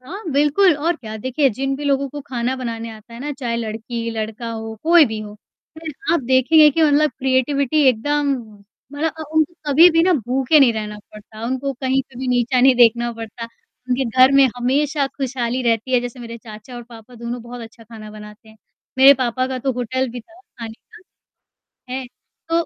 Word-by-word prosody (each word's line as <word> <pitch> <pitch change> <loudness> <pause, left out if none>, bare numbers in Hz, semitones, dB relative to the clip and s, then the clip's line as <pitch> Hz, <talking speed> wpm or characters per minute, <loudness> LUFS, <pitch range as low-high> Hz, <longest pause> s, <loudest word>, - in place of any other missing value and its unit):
हाँ, 345 +12 -9
बिल्कुल 295 +4 +3
और 335 +3 0
क्या। 220 -5 -8
देखिए 260 +5 0
जिन 270 +5 -3
भी 290 - -7
लोगों 275 -1 0
को 290 +2 -8
खाना 245 0 -2
बनाने 230 -2 -5
आता 220 +1 -13
है 235 - -9
ना, 290 +2 -4
चाहे 245 -4 -4
लड़की-लड़का 225 0 -5
हो, 225 0 -6
कोई 335 0 +6
भी 220 -2 -5
हो, 210 -1 -9 0.4
फिर 320 -1 -7 0.2
आप 340 - +2
देखेंगे 265 +5 +5
कि 320 +3 0
मतलब 300 0 +3
क्रिएटिविटी 275 +2 +1
एकदम 285 +4 0 0.6
मतलब 310 +2 -2
अ, 315 - -5
उनको 315 +2 +1 0.2
कभी-भी 330 +3 +6
ना 365 +2 +3
भूखे 265 +4 +3
नहीं 245 -4 +5
रहना 210 -1 -5
पड़ता, 215 +1 -11
उनको 260 +2 -2
कहीं 265 +1 -1
पे 255 -2 -16
भी 260 0 -4
नीचा 250 0 +1
नहीं 260 0 +5
देखना 235 0 +3
पड़ता, 230 0 -8 0.4
उनके 255 +1 0
घर 255 +3 +4
में 275 - +7
हमेशा 280 +3 0
खुशहाली 255 -2 -3
रहती 230 +1 0
है। 245 - +4
जैसे 245 +1 -7
मेरे 235 0 -8
चाचा 220 +2 -12
और 240 - -8
पापा 235 0 -15
दोनों 235 +1 -6
बहुत 240 +1 -9
अच्छा 225 0 -13
खाना 220 -1 -11
बनाते 210 +1 -13
हैं, 220 - -18 0.4
मेरे 270 +1 +8
पापा 255 +1 0
का 260 0 -4
तो 265 +1 -1
होटल 255 +2 -2
भी 245 0 -7
था 335 +9 -21
खाने 230 - -10
का 350 +10 -21 0.7
हैं, 260 -1 -5 0.4
तो 335 0 +1
255 Hz, 195 wpm, -20 LUFS, 230-280 Hz, 0.7 s, मेरे